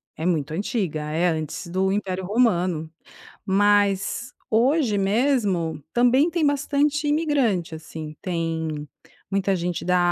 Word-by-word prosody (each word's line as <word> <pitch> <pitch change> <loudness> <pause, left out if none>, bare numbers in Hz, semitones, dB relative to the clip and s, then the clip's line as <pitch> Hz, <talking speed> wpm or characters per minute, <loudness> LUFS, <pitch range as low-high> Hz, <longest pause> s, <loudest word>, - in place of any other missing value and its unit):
É 160 - -6
muito 155 -4 0
antiga, 190 - -2
é 165 +3 +1
antes 155 +2 -3
do 190 +2 0
Império 190 -2 -2
Romano. 180 -7 +1 0.6
Mas 205 +2 +2 0.2
hoje 245 0 +3
mesmo 195 - +1
também 255 +7 +4
tem 330 -2 +1
bastante 285 +1 +1
imigrante, 275 - +1
assim, 155 -1 -8
tem 160 -4 -3 0.4
muita 195 0 +1
gente 175 -1 -2
da 180 0 +3
195 Hz, 120 wpm, -24 LUFS, 165-245 Hz, 0.6 s, também